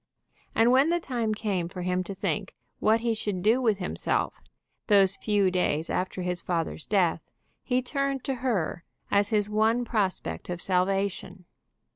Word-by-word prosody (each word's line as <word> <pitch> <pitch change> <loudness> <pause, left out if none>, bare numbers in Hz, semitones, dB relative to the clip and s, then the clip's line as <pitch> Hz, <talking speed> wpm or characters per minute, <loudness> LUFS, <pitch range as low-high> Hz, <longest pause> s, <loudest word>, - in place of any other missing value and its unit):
And 230 +2 +5
when 270 +5 +5
the 345 +1 +2
time 240 -8 -2
came 195 -6 -2
for 180 0 -6
him 180 0 0
to 195 - -6
think 195 +1 -3 0.2
what 220 +1 +3
he 235 -1 +1
should 205 -4 -3
do 225 +5 +4
with 220 -5 +2
himself, 180 -2 -2 0.5
those 195 -2 +5
few 205 -3 +1
days 165 -3 0
after 185 0 -2
his 180 0 -2
father's 165 -2 -3
death, 180 -6 +1 0.3
he 255 0 0
turned 275 0 -2
to 270 - -1
her 195 -9 -1 0.3
as 200 0 +3
his 210 -2 +2
one 220 +3 +2
prospect 205 -7 -2
of 175 -1 -3
salvation. 190 0 -1
200 Hz, 160 wpm, -27 LUFS, 180-230 Hz, 0.5 s, And